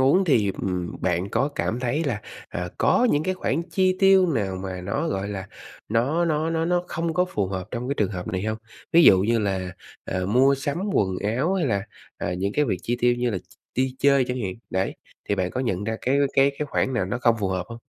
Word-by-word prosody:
uống 145 +9 +4
thì, 110 - +3
ừm, 90 -2 -3
bạn 90 +1 0
có 130 +5 +1
cảm 120 +3 -1
thấy 135 +6 0
là, 120 -8 -1 0.3
à, 90 0 -4
có 250 - +4
những 145 - +2
cái 185 +3 -1
khoản 165 -3 -1
chi 185 +1 +2
tiêu 195 -1 +6
nào 100 -7 -1
mà 95 -1 -5
nó, 90 +2 -2
gọi 95 +1 -2
là, 95 -2 -5 0.4
nó 135 +10 +1
nó 160 0 0
nó 165 0 0
nó 175 +1 +1
không 165 0 -2
có 180 0 +3
phù 105 - -2
hợp 95 0 -5
trong 125 +1 -4
cái 140 - 0
trường 105 -8 0
hợp 90 -1 -5
này 95 -3 -2
hông? 110 +1 -2 0.3
Ví 170 - +7
dụ 95 - +8
như 115 +4 +2
là, 95 -3 -1 0.3
ờ, 90 0 -2
mua 130 +7 +4
sắm 140 +3 -3
quần 95 -2 +1 0.2
áo, 160 +9 +1
hay 180 -6 +1
là, 100 -5 0 0.4
à, 90 - -2
những 95 +3 -2
cái 150 - +2
việc 100 -9 -1
chi 120 - -1
tiêu 120 0 +4
như 120 0 0
là 95 - -2
ch - - -22 0.2
đi 130 0 0
chơi 140 -2 +4
chẳng 125 0 -2
hạn, 95 -2 -3 0.2
đấy, 95 +1 -1 0.3
thì 100 - +2
bạn 95 -2 -1
có 130 - -3
nhận 105 -6 -1
ra 110 +1 -2
cái 135 +3 +1
cái 135 +1 +4
cái 150 - -1
khoản 130 - 0
nào 115 - +1
nó 100 +7 -3
không 115 -1 +3
phù 100 - 0
hợp 90 -1 -2
hông? 115 - -8
120 Hz, 250 wpm, -24 LUFS, 95-145 Hz, 0.4 s, dụ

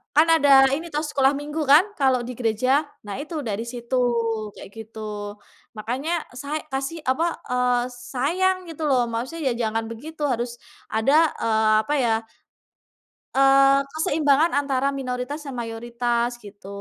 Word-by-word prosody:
kan 310 +2 +6
ada 285 -3 +3 0.3
ini 330 +4 -6
toh, 300 +1 -1
sekolah 275 -2 +2
minggu 295 +2 -5
kan, 305 +5 +8 0.2
kalau 265 -2 +3
di 250 - -5
gereja, 230 +2 0 0.4
nah 205 -1 -5
itu 315 +2 -7
dari 220 0 -3
situ, 240 +1 -4 0.6
kayak - - -11
gitu. 220 0 -10 0.8
Makanya 255 +9 -3 0.3
say 295 +2 -3
kasih, 270 +5 -3
apa, 315 +6 0 0.3
eee, 250 -1 +2 0.3
sayang 360 +9 +1
gitu 320 -1 -6
loh, 260 -2 +3
maksudnya 260 +5 -2
ya - - 0
jangan 225 +1 -2
begitu, 300 +7 -9
harus 240 0 -2 0.4
ada, 220 +6 +2 0.3
eee, 220 -1 +3
apa 290 - -2
ya, 235 - +2 1.2
eee, 275 0 +5
keseimbangan 310 0 +2
antara 275 -1 0
minoritas 255 +2 -4
dan 275 - -5
mayoritas, 235 +1 -1
gitu. 200 -1 -13
265 Hz, 145 wpm, -23 LUFS, 235-295 Hz, 1.2 s, kan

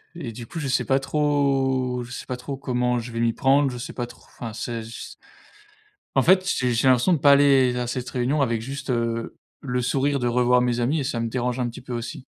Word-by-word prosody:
et 130 -9 -6
du 115 +1 -8
coup 165 - -7
je 145 - -3
sais 130 - +1
pas 135 0 +2
trop 135 -4 0
je 120 - -11
sais - - -6
pas 125 - -4
trop 130 +2 -6
comment 125 -2 0
je 120 +1 -7
vais 115 - -4
m'y 115 -1 +2
prendre, 135 +3 +3
je 125 - -6
sais 120 - -7
pas 120 - -3
tr 120 - -16
enfin, 115 -3 -8
c'est 115 0 -4
je 110 - -10
s - - -9 1.0
En 135 - +4
fait, 185 +1 +5
j'ai 125 -1 +1
j'ai 120 +3 +2
l'impression 130 +8 +4
de 160 - +1
pas 140 +1 +6
aller 135 -3 +5
à 125 -1 -2
cette 125 0 -4
réunion 130 +4 0
avec 115 -4 0
juste, 135 +3 -6
heu, 115 -1 -2 0.2
le 125 -3 -2
sourire 140 +3 +1
de 120 - 0
revoir 125 +1 +3
mes 120 -1 0
amis 145 +6 +1
et - - -1
ça 120 -4 -2
me 115 - -2
dérange 125 0 -2
un 120 - 0
petit 115 - -10
peu 125 -1 -7
aussi. 120 +2 -5
125 Hz, 250 wpm, -24 LUFS, 120-135 Hz, 1.0 s, pas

